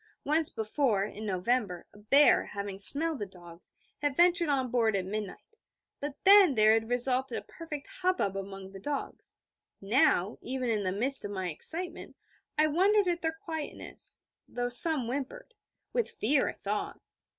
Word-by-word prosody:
Once 310 +2 0
before, 220 -1 -1
in 215 +1 -7
November, 190 -1 -2
a 210 - -17
bear, 275 +8 +3
having 200 -1 -7
smelled 305 +7 +7
the 205 - -4
dogs, 175 -2 -12 0.3
had 290 -2 -2
ventured 345 -1 +3
on 260 -4 -1
board 225 -4 +1
at 190 -2 -2
midnight: 210 - -7 0.4
but 290 -1 -6
then 390 -6 +6
there 215 0 +4
had 225 0 -1
resulted 250 +2 +1
a - - -7
perfect 310 -4 -9 0.2
hubbub 360 - -1
among 195 -1 -8
the 195 - -11
dogs. 285 +6 -7 0.4
Now, 200 -2 +1
even 255 -1 -3
in 215 -2 -1
the 185 -2 -2
midst 255 +8 +3
of 205 - -5
my 190 -3 -4
excitement, 340 - -4 0.4
I 305 - +3
wondered 385 +6 +2
at 345 -1 -2
their 320 0 -3
quietness, 320 -3 +1 0.2
though 245 0 -4
some 270 +1 +4
whimpered 285 - -6 0.4
with 475 - -1
fear, 270 +5 0
I - - -6
thought. 205 +1 -5
250 Hz, 160 wpm, -28 LUFS, 205-310 Hz, 0.4 s, smelled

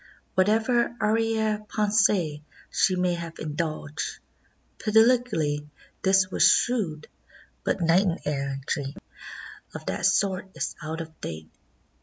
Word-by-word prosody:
Whatever 225 +5 +2
arriere 220 0 +1
pensee 205 -7 +2 0.3
she 185 - +2
may 180 -1 +1
have 170 -1 -6
indulged, 155 -1 -4 0.6
politically 215 -10 +2 0.3
this 190 -1 +3
was - - -2
shrewd, 180 -12 +2 0.6
but 195 - -1
knight 170 +4 +4 0.2
errantry 140 0 -3 0.8
of - - -7
that - - +1
sort 190 -1 +1
is - - -3
out 160 +1 -4
of 160 -1 -11
date. 80 0 -7
185 Hz, 105 wpm, -26 LUFS, 155-215 Hz, 0.8 s, knight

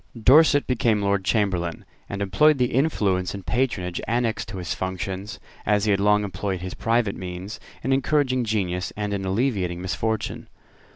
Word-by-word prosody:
Dorset 145 +5 +6
became 115 -4 +1
Lord 100 -1 +1
Chamberlain, 95 -5 0 0.2
and 100 0 -3
employed 145 +11 +4
the 125 -1 0
influence 100 - +1
and 100 -2 -8
patronage 95 -9 -1
annexed 115 -2 0
to 95 0 -7
his 90 -2 -3
functions, 95 +1 -4 0.2
as 105 0 +2
he 105 - +3
had 100 - +2
long 105 +1 +3
employed 95 -1 -3
his 90 0 -5
private 115 -3 0
means, 95 +3 -6 0.2
in 135 - +1
encouraging 135 -2 +1
genius 95 -5 -1
and 105 -1 -2
in 100 -1 -2
alleviating 95 -4 0
misfortune. 110 +4 -3
100 Hz, 160 wpm, -24 LUFS, 95-120 Hz, 0.2 s, Dorset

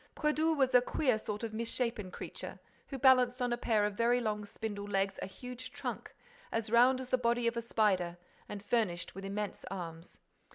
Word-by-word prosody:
Brédoux 310 +1 +2
was 265 -2 +3
a 250 - +8
queer 250 -2 +1
sort 210 0 -5
of 225 -1 -3
misshapen 230 -2 -2
creature, - - -7 0.3
who 275 - -5
balanced 255 -1 +5
on 245 -1 +1
a - - +2
pair 220 -3 +2
of 210 - -1
very 235 +3 +3
long 210 -3 -2
spindle 205 -1 -5
legs 195 -1 0
a - - -3
huge 250 +5 -8
trunk, - - -5 0.4
as 225 -1 -2
round 250 +2 +6
as 260 -1 -6
the 255 - +2
body 235 0 +1
of 235 0 +1
a 235 - -1
spider 190 -7 +1 0.3
and 205 0 -7
furnished 200 -7 0
with 195 - -8
immense 205 +1 -4
arms. 170 -3 -7
230 Hz, 195 wpm, -33 LUFS, 205-250 Hz, 0.4 s, a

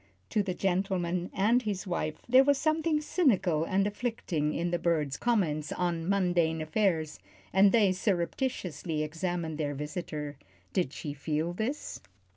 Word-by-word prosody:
To 210 - +2
the 190 -3 -3
gentleman 180 -2 0
and 225 +6 +3
his 205 -4 -3
wife 155 -4 -3
there 255 +2 +7
was 285 0 +3
something 310 +1 +1
cynical 195 - +2
and 195 +3 +1
afflicting 205 -8 -1
in 170 +2 -1
the 175 - 0
bird's 155 -5 0
comment 165 -11 0
on 170 -1 -1
mundane 175 -4 +2
affairs, 155 - 0 0.3
and 195 +2 +6
they 205 -4 +4
surreptitiously 180 - -1
examined 165 0 -3
their 145 -2 -1
visitor. 150 -1 -5 0.4
Did 180 -9 +1
she 145 -1 -5
feel 155 +3 -2
this? 235 +10 -3
180 Hz, 140 wpm, -30 LUFS, 155-205 Hz, 0.4 s, there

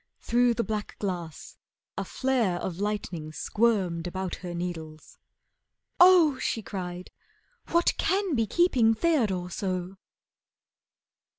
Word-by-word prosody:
Through 240 0 +2
the 235 - 0
black 215 -2 -4
glass 175 -6 -5 0.4
a - - -2
flare 245 -9 0
Of 175 0 -5
lightning 195 -7 -3
squirmed 185 -3 0
about 185 0 -4
her 175 -2 -7
needles. 160 -3 -7 0.8
"Oh!" 350 -7 +7
She 225 - -2
cried. 180 -2 -6 0.6
"What 340 0 +2
can 390 -2 +1
be 225 -4 +1
keeping 250 - +3
Theodore 215 - 0
so!" 185 0 -3
200 Hz, 110 wpm, -27 LUFS, 175-245 Hz, 0.8 s, Oh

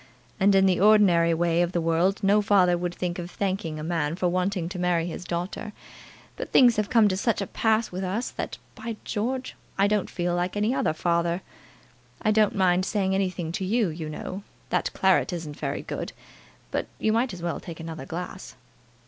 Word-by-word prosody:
And 195 0 +5
in 195 0 +5
the 185 -2 +3
ordinary 190 -5 +5
way 170 +1 +2
of 175 +1 0
the 175 - +1
world 170 +5 +1
no 205 +2 +4
father 195 -4 +4
would 175 0 -3
think 180 0 -3
of 175 0 -5
thanking 185 -5 -2
a 155 - -5
man 160 -2 -1
for 180 0 0
wanting 185 0 0
to 185 0 -6
marry 175 -2 +1
his 175 0 -5
daughter. 180 +4 -4 0.6
But - - -6
things 240 -4 +6
have 210 -1 0
come 225 -3 +5
to 190 - 0
such 220 +4 0
a 200 - -1
pass 220 +3 +1
with 185 +2 -4
us, 200 +7 -2
that, - - -5 0.2
by 225 +1 -6
George! 255 +5 -2 0.2
I 195 - +4
don't 205 -1 +1
feel 175 -1 -1
like 180 +3 -1
any 210 +4 +1
other 210 - +1
father. 170 +2 0 0.8
I 215 - +1
don't 215 -1 +3
mind 185 -1 +3
saying 190 -1 0
anything 185 -4 -1
to 185 - -3
you, 210 +1 +1
you 155 -1 -5
know. 185 +5 -6 0.3
That - - 0
claret 190 0 +3
isn't 160 -4 -6
very - - -3
good, - - -5 0.6
but - - -1
you 215 - +1
might 240 +2 +1
as 175 -2 -8
well 170 -1 -2
take 170 -2 -9
another 160 -4 -7
glass." 180 0 -6
185 Hz, 200 wpm, -26 LUFS, 170-205 Hz, 0.8 s, things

